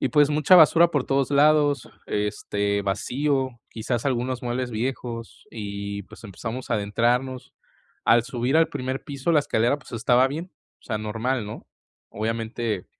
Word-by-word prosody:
y -, -, +1 dB
pues, 145 Hz, +3 st, +4 dB
mucha 150 Hz, +5 st, +5 dB
basura 170 Hz, +1 st, +6 dB
por 145 Hz, -5 st, 0 dB
todos 135 Hz, -1 st, 0 dB
lados, 145 Hz, -2 st, +3 dB, 0.2 s
este, 105 Hz, -1 st, -1 dB
vacío, 130 Hz, +7 st, 0 dB, 0.2 s
quizás 115 Hz, +2 st, -3 dB
algunos 125 Hz, -1 st, -1 dB
muebles 125 Hz, +1 st, -2 dB
viejos, 115 Hz, 0 st, -5 dB
y 100 Hz, -1 st, -5 dB
pues, 110 Hz, +2 st, -15 dB
empezamos 115 Hz, +5 st, -6 dB
a -, -, +3 dB
adentrarnos. 120 Hz, +5 st, -1 dB, 0.5 s
Al 115 Hz, 0 st, +5 dB
subir 125 Hz, +4 st, 0 dB
al 165 Hz, -1 st, +4 dB
primer 130 Hz, -3 st, -4 dB
piso, 140 Hz, +1 st, -3 dB
la 155 Hz, -, +5 dB
escalera, 125 Hz, -1 st, +1 dB
pues 125 Hz, -, -16 dB
estaba 120 Hz, +3 st, +3 dB
bien, 165 Hz, +7 st, -6 dB, 0.3 s
o -, -, -32 dB
sea, 110 Hz, -3 st, -2 dB
normal, 115 Hz, +2 st, -2 dB
¿no? 105 Hz, -, -9 dB, 0.4 s
Obviamente 115 Hz, -1 st, -3 dB
125 Hz, 150 wpm, -24 LUFS, 110-140 Hz, 0.5 s, basura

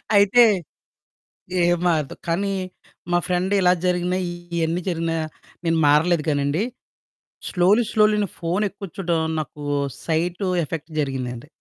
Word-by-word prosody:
అయితే, 205 Hz, +4 st, +6 dB, 1.2 s
ఏం 175 Hz, 0 st, +3 dB
మారదు, 155 Hz, -5 st, 0 dB
కానీ 195 Hz, +4 st, 0 dB, 0.6 s
మా 175 Hz, -, +4 dB
ఫ్రెండిలా 185 Hz, +1 st, +2 dB
జరిగినయీ, 180 Hz, 0 st, 0 dB, 0.3 s
ఇయన్నీ 165 Hz, +2 st, 0 dB
జరిగినా, 165 Hz, -1 st, -1 dB, 0.5 s
నేను 165 Hz, 0 st, +2 dB
మారలేదు 155 Hz, +2 st, +4 dB
గానండి. 145 Hz, +5 st, +1 dB, 0.9 s
స్లోలీ, 195 Hz, +6 st, +4 dB
స్లోలీ 215 Hz, -1 st, +4 dB
నే -, -, -4 dB
ఫోనెక్కువ 195 Hz, +3 st, -2 dB
చూడ్డం 170 Hz, -4 st, 0 dB, 0.2 s
నాకు 150 Hz, 0 st, -7 dB, 0.4 s
సైటు 175 Hz, +4 st, -1 dB, 0.2 s
ఎఫెక్ట్ 160 Hz, +2 st, -6 dB
జరిగిందండి. 130 Hz, -3 st, -3 dB
175 Hz, 110 wpm, -23 LUFS, 160-190 Hz, 1.2 s, అయితే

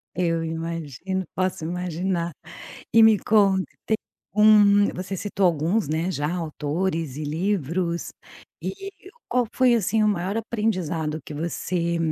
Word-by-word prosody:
Eu 165 Hz, -2 st, 0 dB
imagino, 165 Hz, +2 st, -4 dB
posso 185 Hz, -3 st, -1 dB
imaginar. 175 Hz, 0 st, -2 dB, 0.6 s
E 225 Hz, -1 st, +8 dB
me 220 Hz, -2 st, +7 dB
conta, 195 Hz, -2 st, +3 dB, 0.2 s
tem 220 Hz, -, +1 dB, 0.4 s
um 205 Hz, -1 st, +6 dB
você 185 Hz, +1 st, -5 dB
citou 200 Hz, 0 st, 0 dB
alguns, 175 Hz, +4 st, +1 dB
né, 160 Hz, +4 st, 0 dB
já, 150 Hz, 0 st, -2 dB
autores 160 Hz, -2 st, -2 dB
e 155 Hz, -, -4 dB
livros. 170 Hz, +1 st, -1 dB, 0.5 s
E, 390 Hz, 0 st, -5 dB, 0.4 s
qual 250 Hz, -1 st, +1 dB
foi 255 Hz, -2 st, +4 dB
assim 220 Hz, 0 st, +1 dB
o -, -, +4 dB
maior 200 Hz, +1 st, 0 dB
aprendizado 185 Hz, -9 st, -1 dB
que 150 Hz, -, -7 dB
você 170 Hz, +2 st, -2 dB
180 Hz, 130 wpm, -24 LUFS, 165-205 Hz, 0.6 s, E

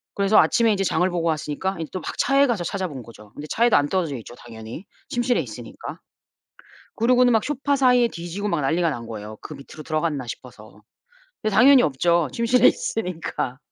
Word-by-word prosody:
그래서 200 Hz, +1 st, +3 dB
아침에 230 Hz, -2 st, +3 dB
인제 195 Hz, -2 st, 0 dB
장을 180 Hz, -1 st, +1 dB
보고 170 Hz, -2 st, -2 dB
왔으니까 160 Hz, +4 st, -2 dB
인제 160 Hz, -, -5 dB
또 185 Hz, -, -3 dB
막 -, -, -6 dB
차에 275 Hz, +1 st, +3 dB
가서 225 Hz, -8 st, -1 dB
찾아본 175 Hz, -, -4 dB
거죠. 105 Hz, -3 st, -15 dB
근데 150 Hz, -, -9 dB
차에도 235 Hz, +1 st, +3 dB
안 145 Hz, -, +2 dB
떨어져 170 Hz, -7 st, -1 dB
있죠 120 Hz, +1 st, -11 dB
당연히 115 Hz, -, -10 dB, 0.2 s
침실에 240 Hz, 0 st, 0 dB
있으니까. -, -, -8 dB, 1.0 s
그러고는 245 Hz, +2 st, +4 dB
막 225 Hz, -2 st, +2 dB
소파 285 Hz, 0 st, -1 dB
사이에 250 Hz, -3 st, +4 dB
뒤지고 175 Hz, +3 st, -5 dB
막 170 Hz, -6 st, 0 dB
난리가 165 Hz, +4 st, +1 dB
난 120 Hz, -5 st, -6 dB
거예요 110 Hz, -1 st, -8 dB
그 -, -, -9 dB
밑으로 145 Hz, +2 st, -11 dB
들어갔나 155 Hz, -4 st, -2 dB
싶어서. 110 Hz, -4 st, -11 dB, 0.6 s
근데 215 Hz, -2 st, -1 dB
당연히 270 Hz, +2 st, +7 dB
없죠 170 Hz, -, +1 dB
침실에 235 Hz, -, +3 dB
있으니까. 165 Hz, -, -3 dB
175 Hz, 420 characters per minute, -23 LUFS, 140-230 Hz, 1.0 s, 당연히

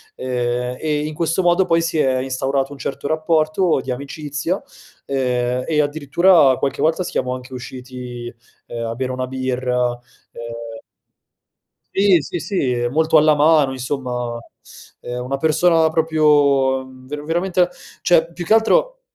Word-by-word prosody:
ehm, 125 Hz, 0 st, -2 dB
e, 150 Hz, -1 st, -1 dB
in 155 Hz, -, -4 dB
questo 165 Hz, +3 st, 0 dB
modo, 175 Hz, +2 st, +3 dB
poi 165 Hz, -1 st, +2 dB
si 165 Hz, -2 st, -1 dB
è 130 Hz, -2 st, +2 dB
instaurato 135 Hz, +1 st, -1 dB
un 140 Hz, -, -9 dB
certo 140 Hz, +1 st, -4 dB
rapporto 155 Hz, 0 st, +1 dB
di 130 Hz, -, -4 dB
amicizia, 145 Hz, +6 st, -4 dB, 0.5 s
ehm, 125 Hz, -2 st, -1 dB
e 155 Hz, -2 st, +1 dB
addirittura 145 Hz, 0 st, +4 dB
qualche 140 Hz, -, -2 dB
volta 165 Hz, +3 st, +2 dB
siamo 125 Hz, -6 st, -2 dB
anche 130 Hz, 0 st, -10 dB
usciti, 125 Hz, -1 st, -8 dB, 0.3 s
ehm, 115 Hz, -1 st, -5 dB
a 115 Hz, -, -4 dB
bere 130 Hz, 0 st, -3 dB
una 130 Hz, 0 st, -3 dB
birra, 125 Hz, -1 st, -1 dB, 0.4 s
ehm 115 Hz, -1 st, -8 dB, 1.2 s
Sì, 195 Hz, -2 st, +4 dB
sì, 175 Hz, +4 st, -5 dB
sì, 160 Hz, -5 st, -1 dB
è 120 Hz, 0 st, 0 dB
molto 160 Hz, +3 st, +3 dB
alla 155 Hz, 0 st, +5 dB
mano, 150 Hz, -2 st, +4 dB
insomma, 125 Hz, -2 st, -4 dB, 0.6 s
ehm, 125 Hz, 0 st, -5 dB
una 135 Hz, +2 st, -2 dB
persona 160 Hz, +2 st, +3 dB
proprio, 145 Hz, -4 st, +3 dB
mhmm, 130 Hz, 0 st, -15 dB
ver 145 Hz, +1 st, -6 dB
veramente 175 Hz, +2 st, +1 dB, 0.3 s
cioè 170 Hz, -1 st, +3 dB
più 175 Hz, -1 st, -6 dB
che 215 Hz, -, +3 dB
altro -, -, +2 dB
140 Hz, 145 wpm, -20 LUFS, 125-160 Hz, 1.2 s, alla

